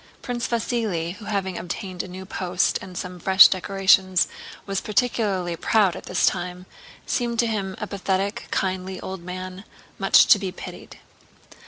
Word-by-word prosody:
Prince 240 Hz, -1 st, -2 dB
Vasíli, 220 Hz, -7 st, -1 dB
who 215 Hz, -, -11 dB
having 195 Hz, -3 st, -2 dB
obtained 180 Hz, 0 st, -5 dB
a -, -, -8 dB
new 185 Hz, +1 st, -8 dB
post 185 Hz, -1 st, 0 dB
and 185 Hz, -2 st, -9 dB
some 180 Hz, 0 st, -6 dB
fresh 190 Hz, +3 st, +8 dB
decorations 190 Hz, -1 st, +3 dB, 0.4 s
was 195 Hz, -1 st, -2 dB
particularly 200 Hz, -5 st, 0 dB
proud 200 Hz, 0 st, +2 dB
at -, -, -9 dB
this 180 Hz, -, +2 dB
time, 180 Hz, 0 st, -2 dB, 0.4 s
seemed 235 Hz, -2 st, -1 dB
to 235 Hz, -, +3 dB
him 200 Hz, -4 st, -2 dB
a -, -, -4 dB
pathetic, 200 Hz, +2 st, -2 dB
kindly 185 Hz, 0 st, -2 dB
old 190 Hz, -1 st, -6 dB
man 185 Hz, +2 st, -7 dB, 0.4 s
much -, -, +6 dB
to 205 Hz, -, +6 dB
be 195 Hz, -2 st, -3 dB
pitied. -, -, -10 dB
190 Hz, 155 wpm, -24 LUFS, 180-205 Hz, 0.4 s, fresh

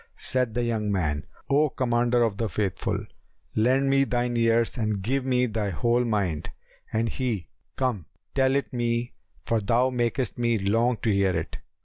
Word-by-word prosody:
Said 125 Hz, -3 st, -1 dB
the 120 Hz, -, +1 dB
young 110 Hz, -3 st, -1 dB
man, 75 Hz, -6 st, -1 dB, 0.2 s
"O 145 Hz, +2 st, +3 dB
Commander 120 Hz, -1 st, +2 dB
of 110 Hz, -4 st, 0 dB
the 115 Hz, -1 st, -1 dB
Faithful, 100 Hz, 0 st, -2 dB, 0.5 s
lend 130 Hz, +5 st, +3 dB
me 135 Hz, 0 st, +4 dB
thine 120 Hz, -2 st, 0 dB
ears 115 Hz, 0 st, +2 dB
and 105 Hz, -4 st, -1 dB
give 130 Hz, +5 st, 0 dB
me 125 Hz, -1 st, +2 dB
thy 110 Hz, -3 st, -2 dB
whole 120 Hz, +7 st, +1 dB
mind." 100 Hz, -9 st, -1 dB, 0.4 s
And 115 Hz, +1 st, +1 dB
he, 115 Hz, -, -2 dB, 0.3 s
"Come; 120 Hz, -, -1 dB, 0.3 s
tell 135 Hz, 0 st, +3 dB
it 140 Hz, -, -1 dB
me, 120 Hz, 0 st, -1 dB, 0.3 s
for 115 Hz, -, +1 dB
thou 120 Hz, +5 st, +2 dB
makest 120 Hz, -1 st, -1 dB
me 120 Hz, -1 st, +2 dB
long 115 Hz, +5 st, +2 dB
to 110 Hz, -, +2 dB
hear 100 Hz, -3 st, +2 dB
it." 80 Hz, -, -4 dB
115 Hz, 165 wpm, -26 LUFS, 105-125 Hz, 0.5 s, me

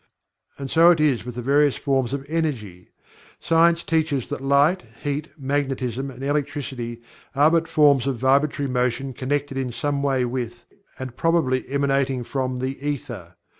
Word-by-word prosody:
And 135 Hz, -1 st, -6 dB
so 165 Hz, +1 st, +6 dB
it 170 Hz, -2 st, +4 dB
is 140 Hz, -7 st, +2 dB
with 125 Hz, -1 st, -7 dB
the 125 Hz, -, -5 dB
various 140 Hz, +2 st, +3 dB
forms 135 Hz, -3 st, 0 dB
of 140 Hz, 0 st, -4 dB
Energy. 130 Hz, -, -3 dB, 0.5 s
Science 170 Hz, +1 st, +3 dB
teaches 155 Hz, -5 st, 0 dB
that -, -, -4 dB
Light, 140 Hz, +6 st, +3 dB, 0.2 s
Heat, 145 Hz, +1 st, -2 dB
Magnetism 135 Hz, -2 st, -2 dB
and 130 Hz, 0 st, -10 dB
Electricity 135 Hz, -5 st, -3 dB, 0.3 s
are 145 Hz, +3 st, +5 dB
but 165 Hz, -1 st, +2 dB
forms 145 Hz, -5 st, +4 dB
of 135 Hz, -3 st, -1 dB
vibratory 140 Hz, +3 st, +2 dB
motion 125 Hz, +1 st, -1 dB
connected 135 Hz, +1 st, -2 dB
in 130 Hz, -2 st, -2 dB
some 140 Hz, +3 st, -2 dB
way 135 Hz, -3 st, +1 dB
with, 120 Hz, -1 st, -5 dB, 0.3 s
and 130 Hz, -2 st, -7 dB
probably 150 Hz, -7 st, +1 dB
emanating 135 Hz, -2 st, 0 dB
from 130 Hz, 0 st, -2 dB
the 130 Hz, +2 st, -4 dB
Ether. 120 Hz, -12 st, -5 dB
135 Hz, 155 wpm, -23 LUFS, 130-145 Hz, 0.5 s, so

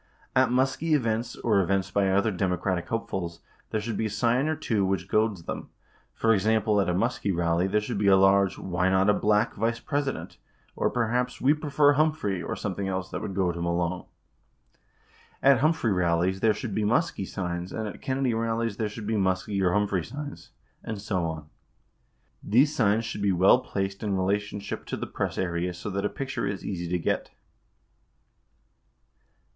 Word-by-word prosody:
At 130 Hz, 0 st, +4 dB
Muskie 135 Hz, +5 st, +1 dB
events 115 Hz, -3 st, -1 dB
or 105 Hz, -4 st, +2 dB
events 95 Hz, +1 st, 0 dB
by 100 Hz, -1 st, +2 dB
other 100 Hz, +3 st, +2 dB
Democratic 90 Hz, -1 st, -1 dB
hopefuls, 90 Hz, -7 st, -3 dB, 0.3 s
there 110 Hz, -, -1 dB
should 110 Hz, -1 st, -4 dB
be 110 Hz, -, 0 dB
a -, -, -5 dB
sign 120 Hz, +6 st, +1 dB
or 155 Hz, -, 0 dB
two 115 Hz, -9 st, 0 dB
which 95 Hz, -2 st, -1 dB
goads 105 Hz, -4 st, +1 dB
them. -, -, -6 dB, 0.5 s
For 115 Hz, 0 st, +3 dB
example, 105 Hz, 0 st, +2 dB
at 95 Hz, -, 0 dB
a -, -, +1 dB
Muskie 100 Hz, +1 st, 0 dB
rally, 85 Hz, +1 st, +1 dB
there 105 Hz, +2 st, +1 dB
should 105 Hz, -1 st, -3 dB
be 100 Hz, -, +1 dB
a 95 Hz, -, +7 dB
large 95 Hz, 0 st, +4 dB
"Why 90 Hz, 0 st, 0 dB
Not 95 Hz, +2 st, +4 dB
a -, -, +3 dB
Black 105 Hz, +2 st, +2 dB
Vice 115 Hz, +2 st, -1 dB
President" 140 Hz, -2 st, -3 dB, 0.4 s
or -, -, +1 dB
perhaps 125 Hz, +1 st, -1 dB
"We 140 Hz, +3 st, +4 dB
Prefer 150 Hz, -1 st, +3 dB
Humphrey" 150 Hz, -, +1 dB
or -, -, -4 dB
some 100 Hz, -, -3 dB
thing 100 Hz, +1 st, -3 dB
else 95 Hz, 0 st, -3 dB
that -, -, -4 dB
would 95 Hz, -, -5 dB
goad 90 Hz, -3 st, +1 dB
him 85 Hz, 0 st, -2 dB
along. 85 Hz, +1 st, -1 dB, 1.4 s
At 135 Hz, -2 st, +6 dB
Humphrey 155 Hz, -6 st, +2 dB
rallies, 90 Hz, +1 st, +1 dB
there 110 Hz, +1 st, +3 dB
should 115 Hz, -5 st, -5 dB
be 110 Hz, -, 0 dB
Muskie 110 Hz, -, 0 dB
signs 90 Hz, -1 st, -4 dB
and 110 Hz, -1 st, -3 dB
at 105 Hz, -, -8 dB
Kennedy 130 Hz, -2 st, 0 dB
rallies 115 Hz, -1 st, -1 dB
there 110 Hz, -2 st, -1 dB
should 105 Hz, +1 st, -8 dB
be 110 Hz, -, -1 dB
Muskie 95 Hz, +1 st, 0 dB
or 90 Hz, -2 st, +2 dB
Humphrey 100 Hz, -3 st, +1 dB
signs, 145 Hz, -, -8 dB, 0.3 s
and 110 Hz, -2 st, -5 dB
so 95 Hz, -4 st, -1 dB
on. 80 Hz, -2 st, -5 dB, 1.0 s
These 140 Hz, +8 st, +3 dB
signs 110 Hz, -3 st, +2 dB
should 115 Hz, -2 st, -5 dB
be 100 Hz, -1 st, +2 dB
well 95 Hz, +7 st, +5 dB
placed 100 Hz, -4 st, -3 dB
in 100 Hz, -3 st, -1 dB
relationship 100 Hz, +2 st, -2 dB
to -, -, -3 dB
the -, -, -4 dB
press -, -, -3 dB
area 90 Hz, 0 st, -1 dB
so 90 Hz, +4 st, -6 dB
that 100 Hz, +1 st, -2 dB
a -, -, +1 dB
picture 135 Hz, -6 st, -3 dB
is 100 Hz, -1 st, -4 dB
easy 90 Hz, -3 st, -3 dB
to 90 Hz, -, +1 dB
get. 85 Hz, -, -1 dB
100 Hz, 185 wpm, -27 LUFS, 95-115 Hz, 1.4 s, a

